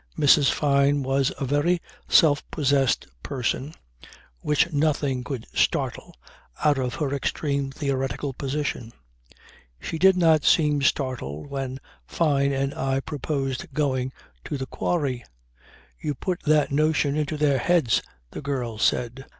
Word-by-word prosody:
Mrs. 145 -1 +5
Fyne 140 -1 +2
was 135 +1 +1
a 135 - -1
very 145 +6 +1 0.3
self 145 -3 +5
possessed 140 -3 +1 0.2
person 135 - -3 0.6
which 150 +3 +1
nothing 145 -3 0
could 130 -4 -5
startle - - -1 0.5
out 145 -2 +4
of 125 -2 -2
her 140 -2 -2
extreme 140 0 -1
theoretical 135 0 -2
position. 135 -4 -3 0.9
She 160 - -5
did 190 +1 +5
not 160 -4 +4
seem 150 -3 +3
startled 130 - -2
when 135 -1 -4 0.3
Fyne 140 -4 +1
and 135 +1 -1
I 135 0 -1
proposed 145 +2 -3
going 130 -3 0 0.3
to 145 - -3
the 135 - -4
quarry. 135 -4 -2 0.8
"You 145 - -3
put 180 -2 -3
that 150 -1 +3
notion 150 -1 +2
into 150 0 -1
their 145 -3 +2
heads," 160 -5 +2 0.3
the - - -7
girl 125 -6 -3
said. 125 +3 0
140 Hz, 130 wpm, -25 LUFS, 135-150 Hz, 0.9 s, Mrs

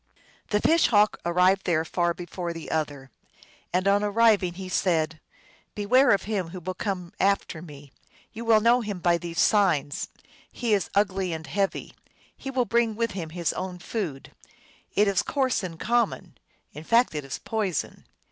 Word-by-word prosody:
The 210 - +2
Fish 330 +8 +4
Hawk 210 -2 +3
arrived 180 +3 +3
there 165 -2 +2
far 175 +1 0
before 175 0 -5
the 165 -1 -8
other. 145 -4 -3 0.6
And 185 +2 +1
on 200 +1 +3
arriving 205 -4 +3
he 190 0 -7
said, 160 -4 0 0.3
" - - -32
Beware 250 +7 +4
of 200 - +3
him 200 -4 -2
who 185 +2 -7
will 185 +2 -4
come 180 -3 -4
after 195 -4 +1
me. 145 -4 -12 0.4
You 230 +1 -6
will 225 -2 +4
know 235 +3 +4
him 205 -4 -4
by 175 -1 +2
these 170 -1 -5
signs: 170 -10 +2 0.4
he 235 -3 -1
is 195 -4 +1
ugly 195 -3 +1
and 160 0 -6
heavy; 195 +1 -2 0.4
he 270 - -7
will 255 -2 0
bring 230 0 +1
with 230 0 -1
him 175 -5 -5
his 170 0 -2
own 185 -1 -5
food. 175 -7 -5 0.6
It 205 +1 +4
is 195 -2 +2
coarse 265 -5 0
and 170 -4 -7
common; 235 -1 0 0.4
in 150 - -9
fact 230 +5 +3
it 150 -1 -3
is 135 - -5
poison. 210 -6 -3
190 Hz, 175 wpm, -26 LUFS, 170-215 Hz, 0.6 s, Fish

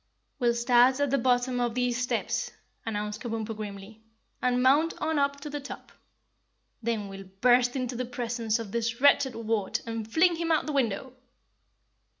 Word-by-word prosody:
"We'll 240 -2 +2
start 245 +2 +4
at 285 -2 +1
the 275 - +2
bottom 245 0 +1
of 240 -1 -1
these 250 -1 0
steps," 245 - -1 0.4
announced 210 0 -3
Kabumpo 225 -2 -4
grimly, 210 0 -8 0.4
"and 250 0 +1
mount 295 +6 +4
on 315 -1 0
up 280 0 0
to 300 - -6
the 290 - -3
top. 280 - -9 0.9
Then 225 -3 -2
we'll 195 0 -9 0.2
burst 245 0 +4
into 255 -2 -2
the 250 +1 -2
presence 235 -2 -2
of 225 -4 -7
this 230 +1 -2
wretched 275 -2 +4
wart 225 -3 -1
and 225 -1 -5
fling 340 +3 +4
him 335 0 -1
out 315 - +4
of - - -13
the 305 - -3
window." 255 -1 -1
245 Hz, 170 wpm, -28 LUFS, 225-265 Hz, 0.9 s, start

